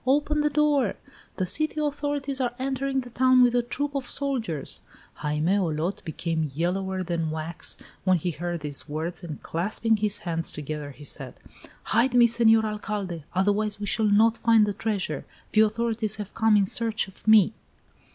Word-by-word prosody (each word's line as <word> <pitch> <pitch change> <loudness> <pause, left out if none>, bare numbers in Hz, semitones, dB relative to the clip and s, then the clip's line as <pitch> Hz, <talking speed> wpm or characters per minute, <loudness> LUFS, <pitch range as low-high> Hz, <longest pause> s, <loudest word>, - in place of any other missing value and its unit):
Open 295 +2 +2
the 295 - +2
door! 290 -6 +2 0.4
The 185 - 0
city 310 - 0
authorities 290 -2 -2
are 245 -1 -1
entering 270 0 -1
the 245 -1 -11
town 255 +1 +5
with 245 -1 +4
a 245 - +3
troop 285 +4 -3
of 275 -3 -3
soldiers!" 235 - -3 0.4
Jaime 150 +5 0
Olot 170 0 -1
became 160 -1 -2
yellower 185 +3 -1
than 170 -2 -2
wax 160 +1 -3 0.3
when 185 -1 +4
he 175 +2 -2
heard 175 +1 -4
these 145 -2 -4
words, 160 +4 -4
and 155 -4 -7
clasping 215 +6 0
his 210 -1 +1
hands 165 -1 -1
together, 150 0 -5
he 145 +1 -12
said: 145 - -7 0.6
"Hide 240 +3 +3
me, 240 -1 +7
Senor 225 -1 +4
Alcalde! 205 -6 -4
Otherwise 205 +2 +1
we 205 - -3
shall 215 +2 +2
not 220 +3 +4
find 225 -2 +5
the 205 - -2
treasure! 210 -1 -2 0.3
The 215 - +5
authorities 220 0 +1
have 210 -1 -6
come 220 -2 +4
in 200 - +3
search 225 +1 0
of 195 +2 -17
me!" 215 -4 +6
210 Hz, 170 wpm, -26 LUFS, 175-245 Hz, 0.6 s, me